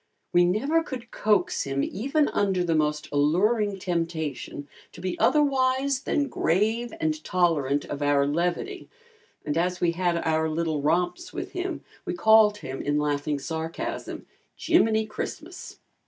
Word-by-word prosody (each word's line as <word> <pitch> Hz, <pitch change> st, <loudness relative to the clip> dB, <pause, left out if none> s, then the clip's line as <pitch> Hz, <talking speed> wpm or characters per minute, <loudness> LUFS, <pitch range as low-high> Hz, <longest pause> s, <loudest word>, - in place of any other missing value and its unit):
We 175 Hz, 0 st, +5 dB
never 275 Hz, -, +2 dB
could 250 Hz, -5 st, -7 dB
coax 205 Hz, -4 st, +1 dB
him 140 Hz, 0 st, -1 dB
even 275 Hz, +8 st, 0 dB
under 190 Hz, -3 st, +1 dB
the 170 Hz, -2 st, 0 dB
most 150 Hz, -1 st, 0 dB
alluring 195 Hz, +8 st, +2 dB
temptation 165 Hz, -6 st, -3 dB, 0.3 s
to -, -, -12 dB
be 185 Hz, 0 st, -3 dB
otherwise 270 Hz, -2 st, +2 dB
than 285 Hz, -1 st, +1 dB
grave 220 Hz, +2 st, 0 dB
and 315 Hz, -1 st, -1 dB
tolerant 150 Hz, -6 st, +1 dB
of 145 Hz, -, -6 dB
our 145 Hz, -1 st, +3 dB
levity 175 Hz, -, -2 dB, 0.6 s
and 150 Hz, -, -1 dB
as 180 Hz, +2 st, 0 dB
we 170 Hz, -, +2 dB
had 175 Hz, 0 st, 0 dB
our 160 Hz, 0 st, +1 dB
little 160 Hz, -2 st, -1 dB
romps 175 Hz, -, 0 dB
with -, -, -5 dB
him 365 Hz, +1 st, -4 dB, 0.2 s
we 360 Hz, -2 st, -3 dB
called 220 Hz, -7 st, +5 dB
him 135 Hz, -8 st, -6 dB
in 145 Hz, +1 st, 0 dB
laughing 145 Hz, 0 st, 0 dB
sarcasm, 160 Hz, +3 st, -5 dB, 0.3 s
"Jiminy 220 Hz, -10 st, +2 dB
Christmas." 315 Hz, +10 st, -7 dB
180 Hz, 140 wpm, -26 LUFS, 155-240 Hz, 0.6 s, We